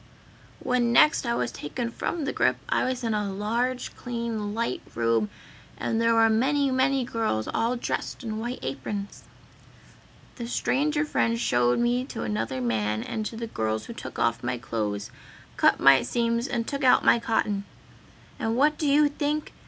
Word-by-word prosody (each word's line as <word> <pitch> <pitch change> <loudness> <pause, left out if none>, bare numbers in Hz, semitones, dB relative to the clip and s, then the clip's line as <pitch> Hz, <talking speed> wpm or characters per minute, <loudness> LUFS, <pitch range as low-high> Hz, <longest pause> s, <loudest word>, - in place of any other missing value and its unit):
"When 245 -2 +1
next 270 +2 +5
I 235 - +1
was - - -1
taken 235 +11 -4
from 310 +5 -3
the - - -2
grip - - +2
I - - +1
was 255 -1 -2
in 225 -2 0
a 210 -2 -1
large, 235 +6 -2
clean, 230 -4 -4
light 230 +1 -1
room 115 -2 +1 0.5
and 225 - -1
there 230 0 +3
were 225 0 +6
many, 270 +5 +2
many 260 +1 +2
girls 225 - -1
all 235 +2 0
dressed 245 - -4
in 220 -2 -4
white 240 +3 -3
aprons. 200 +10 -5 1.1
"The 235 -2 -5
stranger 295 +5 +1
friend 230 -5 0
showed 120 - +2
me 240 +1 +1
to - - -6
another 110 +5 -2
man 110 -2 0
and 215 -1 -3
to 225 - -8
the 230 - -3
girls 110 - -2
who - - -7
took - - -8
off 115 0 +1
my 125 +1 -1
clothes, 105 -5 -3 0.4
cut - - +4
my 135 -1 +7
seams 235 +1 0
and 235 -3 -2
took 280 -1 -3
out 255 - +5
my - - +6
cotton. 210 -3 0 0.7
And 225 0 -1
what 300 +3 +3
do 300 - 0
you 295 +1 +5
think! 295 +1 -2
230 Hz, 175 wpm, -26 LUFS, -, 1.1 s, my